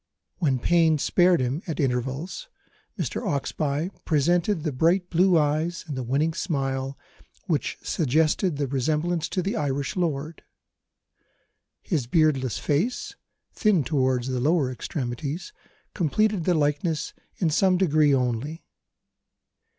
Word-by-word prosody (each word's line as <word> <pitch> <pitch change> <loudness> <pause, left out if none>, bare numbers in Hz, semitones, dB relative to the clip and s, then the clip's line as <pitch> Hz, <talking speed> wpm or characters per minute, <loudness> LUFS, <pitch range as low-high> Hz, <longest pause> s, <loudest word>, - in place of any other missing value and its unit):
When 140 -7 +2
pain 160 +3 +3
spared 175 +2 +3
him 130 +6 -1
at 160 - -4
intervals, 135 - -2 0.5
Mr. - - -2
Oxbye 155 - -1
presented 170 +3 +1
the 155 - -1
bright 175 +7 +1
blue 180 +1 +4
eyes 155 +4 0
and 145 - -4
the 130 - -3
winning 140 +6 0
smile 135 -5 -2 0.5
which - - -1
suggested 155 +3 +1
the 145 - 0
resemblance 150 +5 -1
to 185 - -1
the 195 - -2
Irish 140 -2 -2
lord. 160 -3 -2 1.4
His 145 -9 -1
beardless 135 -6 +2
face, 175 - -1 0.4
thin 210 - +2
towards 130 -3 0
the 130 -1 -1
lower 145 0 +2
extremities, 135 - -4 0.4
completed 200 +1 +1
the 180 - +3
likeness 150 +1 0 0.2
in 170 -5 +1
some 185 +3 +3
degree 155 -5 +3
only. 130 +4 -1
155 Hz, 120 wpm, -25 LUFS, 135-175 Hz, 1.4 s, blue